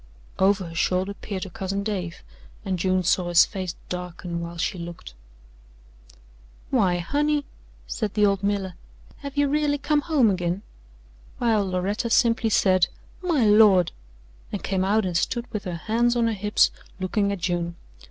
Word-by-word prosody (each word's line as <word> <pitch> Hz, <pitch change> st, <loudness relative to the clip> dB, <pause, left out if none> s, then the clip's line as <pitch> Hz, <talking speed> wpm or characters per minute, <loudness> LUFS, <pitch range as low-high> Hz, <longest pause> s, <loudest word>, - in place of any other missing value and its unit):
Over 190 Hz, -2 st, +2 dB
her -, -, -10 dB
shoulder 185 Hz, +4 st, 0 dB
peered 200 Hz, -2 st, -6 dB
her 190 Hz, -, -8 dB
cousin 195 Hz, +3 st, -3 dB
Dave, 185 Hz, -5 st, -4 dB, 0.4 s
and 190 Hz, -2 st, -1 dB
June 185 Hz, +1 st, +1 dB
saw 180 Hz, 0 st, +1 dB
his 175 Hz, 0 st, +7 dB
face 185 Hz, -4 st, -5 dB
darken 180 Hz, -1 st, -5 dB
while 170 Hz, 0 st, -6 dB
she 180 Hz, +2 st, -2 dB
looked. 170 Hz, -, -8 dB, 1.6 s
"Why, 195 Hz, -9 st, +3 dB
Honey," 290 Hz, -, 0 dB, 0.4 s
said 215 Hz, -3 st, -3 dB
the 210 Hz, -1 st, +4 dB
old 200 Hz, -1 st, +2 dB
miller, 200 Hz, -2 st, -1 dB, 0.4 s
"have 280 Hz, 0 st, -8 dB
ye 285 Hz, -, +4 dB
really 290 Hz, 0 st, +1 dB
come 295 Hz, +1 st, +1 dB
home 280 Hz, -9 st, +3 dB
agin?" 180 Hz, +1 st, -2 dB, 0.7 s
While 215 Hz, -5 st, +1 dB
Loretta 195 Hz, +6 st, -1 dB
simply 230 Hz, 0 st, +3 dB
said: 185 Hz, -4 st, +4 dB, 0.3 s
"My 330 Hz, -10 st, +2 dB
Lord!" 205 Hz, -4 st, +6 dB, 0.6 s
and -, -, -4 dB
came 190 Hz, -1 st, 0 dB
out 205 Hz, +2 st, +2 dB
and 180 Hz, -2 st, -3 dB
stood 235 Hz, +7 st, 0 dB
with 215 Hz, -1 st, -4 dB
her 180 Hz, -2 st, -3 dB
hands 235 Hz, +7 st, +1 dB
on 235 Hz, -1 st, +2 dB
her 230 Hz, -, +1 dB
hips 210 Hz, +1 st, +2 dB, 0.3 s
looking 200 Hz, +2 st, 0 dB
at 200 Hz, -, -2 dB
June. 170 Hz, -1 st, -2 dB
195 Hz, 160 wpm, -24 LUFS, 180-225 Hz, 1.6 s, his